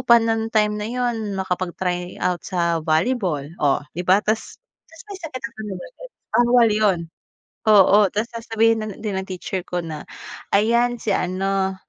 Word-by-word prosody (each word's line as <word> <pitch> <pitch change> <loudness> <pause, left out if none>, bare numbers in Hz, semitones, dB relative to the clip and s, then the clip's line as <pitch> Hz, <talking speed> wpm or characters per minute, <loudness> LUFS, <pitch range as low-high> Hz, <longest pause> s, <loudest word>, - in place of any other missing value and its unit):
pa 235 - +8
ng 225 0 -1
time 210 -1 +3
na 210 - -3
'yon 230 -4 -2
makapag-try 180 -1 -2
out 180 -1 0
sa 170 -2 0
volleyball 165 - +1 0.2
o, 145 -1 +2
'di 180 - -1
ba? 190 +3 +5
Tapos 215 +1 -2 0.3
tapos 325 0 -15
may 395 - -6
sakit 295 -6 -6
naman 215 -5 -6 0.2
ako, - - -13 0.4
bawal 240 -1 +5
'yon, 210 -4 +2 0.7
oo. 205 -1 +7
Tapos 215 +3 -1
sasabihin 225 -1 +1
na 215 - -4
din 210 -3 -4
ng 190 - -6
teacher 185 0 -4
ko 175 -1 -2
na 155 -2 -7 0.5
ayan 235 +3 +3
si 215 - -1
ano, 190 +1 0
210 Hz, 160 wpm, -22 LUFS, 185-225 Hz, 0.7 s, pa